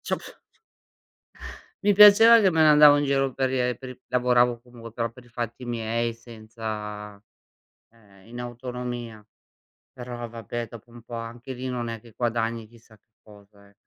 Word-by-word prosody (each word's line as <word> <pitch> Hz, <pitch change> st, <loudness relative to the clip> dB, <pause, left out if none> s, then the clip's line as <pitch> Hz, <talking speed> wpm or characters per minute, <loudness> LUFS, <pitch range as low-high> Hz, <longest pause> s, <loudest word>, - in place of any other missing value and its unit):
Ci -, -, -7 dB
ho -, -, +3 dB
pr -, -, -13 dB, 1.5 s
mi 205 Hz, -, +5 dB
piaceva 210 Hz, +3 st, +8 dB
che 195 Hz, -, +4 dB
me 160 Hz, -2 st, +2 dB
ne 155 Hz, -, +6 dB
andavo 150 Hz, -1 st, +7 dB
in 145 Hz, -, 0 dB
giro 135 Hz, -1 st, 0 dB
per 130 Hz, -1 st, 0 dB
i 130 Hz, -, -1 dB
e 125 Hz, 0 st, 0 dB
per 130 Hz, 0 st, -10 dB
i 125 Hz, 0 st, -11 dB
lavoravo, 125 Hz, -1 st, +2 dB
comunque, 120 Hz, -2 st, -13 dB
però 115 Hz, 0 st, -3 dB
per 125 Hz, +2 st, -16 dB
i 120 Hz, -, -20 dB
fatti 120 Hz, +1 st, -6 dB
miei 115 Hz, 0 st, -2 dB
senza 110 Hz, -3 st, -8 dB, 0.7 s
ehm, 100 Hz, -3 st, -22 dB
in 120 Hz, +1 st, -8 dB
autonomia. 120 Hz, -2 st, -7 dB, 0.7 s
Però, 120 Hz, -1 st, -7 dB
vabbè, 115 Hz, +1 st, -6 dB
dopo 115 Hz, +1 st, -14 dB
un 120 Hz, 0 st, -13 dB
po' 120 Hz, 0 st, -9 dB
anche 120 Hz, +3 st, -7 dB
lì 130 Hz, +1 st, -6 dB
non 120 Hz, -2 st, -3 dB
è 115 Hz, -1 st, -6 dB
che 115 Hz, 0 st, -18 dB
guadagni 115 Hz, -2 st, -2 dB
chissà 115 Hz, -1 st, -20 dB
che 110 Hz, -, -50 dB
cosa, 100 Hz, -1 st, -19 dB
eh. 100 Hz, -, -24 dB
120 Hz, 180 wpm, -25 LUFS, 115-125 Hz, 1.5 s, piaceva